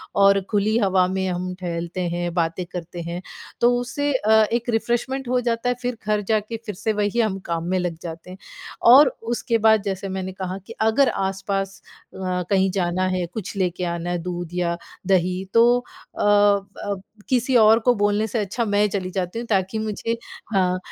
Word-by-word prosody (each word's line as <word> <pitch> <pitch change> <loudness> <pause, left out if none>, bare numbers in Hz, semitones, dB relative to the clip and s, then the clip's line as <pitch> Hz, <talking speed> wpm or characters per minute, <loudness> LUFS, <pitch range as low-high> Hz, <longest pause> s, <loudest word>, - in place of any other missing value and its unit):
और 200 0 +5
खुली 210 +2 +2
हवा 190 -3 +3
में 190 0 -1
हम 180 0 -3
टहलते 170 0 -4
हैं, 175 -1 -2
बातें 170 +1 -1
करते 175 0 -6
हैं 170 +2 -5 0.4
तो 240 +1 +5
उससे 285 +4 -2
अ, 220 -4 +1 0.2
एक 240 +1 -1
रिफ्रेशमेंट 240 +3 -1
हो 250 0 +2
जाता 235 +1 0
है, 245 - +1
फिर 245 -2 -2
घर 210 -1 +2
जा 215 -1 +4
के 225 +2 -6
फिर 210 -4 -5
से 215 +2 -1
वही 210 +3 0
हम 215 -4 +1
काम 170 -1 -2
में 185 - +1
लग 175 -2 -2
जाते 165 +1 -8
हैं। 185 - -9 0.5
और 275 +2 +9 0.3
उसके 235 -1 0
बाद 220 -1 +6
जैसे 195 -1 -3
मैंने 190 0 -4
कहा 185 0 -4
कि - - -8
अगर 230 +5 +4
आस-पास 195 0 -2 0.3
अ, - - -11 0.3
कहीं 190 -1 +3
जाना 185 -1 0
है, 185 -1 -1
कुछ 210 -1 -5
लेके 180 -1 -1
आना 170 0 -3
है, 175 - 0
दूध 175 -1 -5
या 170 -1 -1 0.3
दही 185 0 +2
तो 230 0 +6
अ 245 - -9
अ, 205 -1 +2 0.3
किसी 255 0 +1
और 220 +1 +6
को 245 +2 +3
बोलने 205 +1 +1
से 220 +2 -2
अच्छा 220 +4 -1
मैं 205 0 +2
चली 185 -2 -3
जाती 185 +3 -3
हूँ 240 - -5
ताकि 195 +1 0
मुझे 220 +2 -2 0.4
हाँ। 185 -1 +2
195 Hz, 190 wpm, -23 LUFS, 180-220 Hz, 0.5 s, और